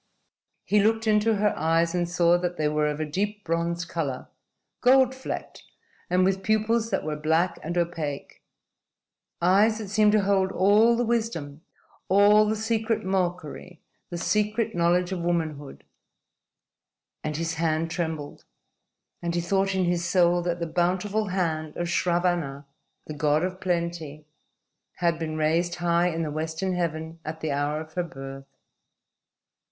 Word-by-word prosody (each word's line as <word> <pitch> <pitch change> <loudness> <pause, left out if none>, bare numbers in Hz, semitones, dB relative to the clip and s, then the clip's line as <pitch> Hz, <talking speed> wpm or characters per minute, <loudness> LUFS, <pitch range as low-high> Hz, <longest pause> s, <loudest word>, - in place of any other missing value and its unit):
He 210 - +2
looked 220 +2 +2
into 215 +1 +3
her 210 0 +2
eyes 165 +2 +1
and 175 -1 -1
saw 175 0 +3
that 175 0 -3
they 155 - +1
were 150 0 +1
of 150 0 -3
a 155 - -1
deep 205 +7 -3
bronze 170 +1 -1
color, 155 -7 -4 0.5
gold 260 0 +5
flecked, 265 0 -6 0.5
and 180 +1 +3
with 190 0 +1
pupils 220 +2 +1
that - - -1
were 155 0 -3
black 160 +4 +1
and 170 +3 -4
opaque 165 -5 -3 1.0
eyes 205 +5 +4
that 215 -3 -6
seemed 210 0 +3
to 215 -2 +3
hold 195 -1 +2
all 210 +5 +4
the 245 - +1
wisdom, 195 -11 -2 0.5
all 205 +2 +6
the 215 - +1
secret 220 -1 -1
mockery, 180 -2 -3 0.3
the 175 - -5
secret 210 +5 0
knowledge 175 +1 +2
of 185 - -2
womanhood 160 -5 -3 1.4
and 150 -1 -3
his 165 0 -2
hand 165 0 0
trembled, 160 -4 -4 0.8
and 170 0 -2
he 175 - +1
thought 195 +2 0
in 185 -1 +1
his 175 0 0
soul 175 0 +3
that 175 0 -2
the 170 - -1
bountiful 185 +5 0
hand 160 -5 -2
of 175 - -2
Sravanna, 170 -5 0 0.4
the 155 - -6
God 150 +1 +1
of 185 +1 -3
Plenty, 170 -4 -3 0.7
had 170 -2 0
been 155 -1 -3
raised 165 +3 +1
high 175 0 +2
in 165 -1 -2
the 150 - -3
western 160 +4 -2
heaven 165 -2 -3
at 160 +1 -6
the 155 - -2
hour 145 +2 -1
of 155 0 -9
her 180 - -1
birth. 135 -3 -9
175 Hz, 155 wpm, -26 LUFS, 160-195 Hz, 1.4 s, all